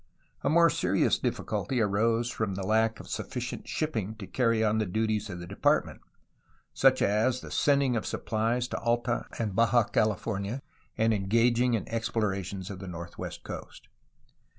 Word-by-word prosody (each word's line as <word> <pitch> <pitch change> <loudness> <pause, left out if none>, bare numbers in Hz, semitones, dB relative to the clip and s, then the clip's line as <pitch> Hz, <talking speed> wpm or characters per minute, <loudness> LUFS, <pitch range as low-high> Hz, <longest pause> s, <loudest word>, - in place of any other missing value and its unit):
A - - +1
more 170 +1 +5
serious 95 +2 +2
difficulty 130 -2 -2
arose 115 +3 +1
from 105 -4 -2
the 95 0 -4
lack 110 +2 +2
of - - -10
sufficient - - -5
shipping 110 -9 -2
to 110 -3 -8
carry 115 0 +1
on 110 0 +2
the 110 - 0
duties 110 +2 -1
of 90 - -5
the 85 - -7
Department, 95 +3 +1 0.7
such 130 -1 +4
as 115 +5 +2
the - - -10
sending 140 -3 +3
of 110 -4 -1
suppHes 115 +3 -1
to - - -2
Alta 120 +1 0
and 105 -4 -2
Baja 115 +1 +4
California 105 +3 -1 0.3
and 110 0 +3
engaging 115 +4 +2
in 105 - -3
explorations 100 -4 -2
of 95 - -7
the 95 - -8
northwest 85 -1 -7
coast. - - -9
110 Hz, 155 wpm, -29 LUFS, 100-120 Hz, 0.7 s, more